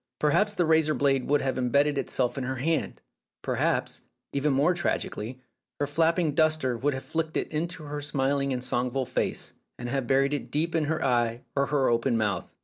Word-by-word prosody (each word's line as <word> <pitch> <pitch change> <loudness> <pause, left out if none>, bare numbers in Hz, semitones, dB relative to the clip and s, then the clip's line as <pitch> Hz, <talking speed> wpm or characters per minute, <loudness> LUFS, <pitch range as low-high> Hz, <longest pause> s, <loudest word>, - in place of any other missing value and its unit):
Perhaps 205 +8 +2
the 180 -3 +2
razor 160 -1 +3
blade 135 -1 +1
would 145 +1 +3
have 130 -1 -1
embedded 140 +4 +2
itself 125 -2 0
in 135 - -3
her 130 +1 -2
hand; 155 +5 -1 0.4
perhaps, - - -1 0.3
even 140 +1 +1
more 145 +6 +3
tragically, 130 -8 -2 0.4
her 145 - +1
flapping 165 +2 +1
duster 155 -5 +2
would 140 +4 0
have 130 - -5
flicked 160 -1 -2
it - - -2
into 165 +1 -3
her 145 0 -5
smiling 140 -1 0
and 125 -1 -2
songful 125 +1 -1
face, - - -2 0.2
and 120 - -5
have 135 -1 -1
buried 135 +2 +3
it 145 - -3
deep 165 +3 0
in 160 -2 +1
her 155 +2 -1
eye 120 -2 +1
or 140 0 +2
her 140 -3 +2
open 120 +1 +2
mouth. 105 -5 -1
140 Hz, 190 wpm, -27 LUFS, 130-155 Hz, 0.4 s, razor